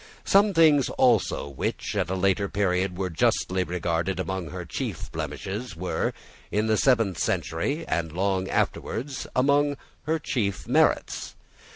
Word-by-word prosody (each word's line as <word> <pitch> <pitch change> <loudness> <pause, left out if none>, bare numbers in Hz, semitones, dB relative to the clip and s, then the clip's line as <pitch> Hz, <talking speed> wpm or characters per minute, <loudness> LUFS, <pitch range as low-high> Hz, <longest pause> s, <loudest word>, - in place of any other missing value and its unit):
Some 200 0 +4
things 155 -4 +5
also 120 - +2
which 70 -2 -3
at - - 0
a 95 - -1
later 100 +1 +1
period 90 -2 0
were 95 -1 -2
justly 90 +3 +1
regarded 90 +1 -1
as - - +1
among 95 -4 -4
her - - -6
chief - - -5
blemishes 105 +4 -5
were, 90 +2 -1 0.4
in 105 +1 0
the 110 0 +2
seventh 115 -8 +2
century, 140 - -1
and 80 0 -1
long 95 +2 0
afterwards, 130 +4 -2
among 145 +2 +3 0.3
her 160 +1 +2
chief 105 -10 -2
merits. - - +1
100 Hz, 145 wpm, -26 LUFS, 90-130 Hz, 0.4 s, things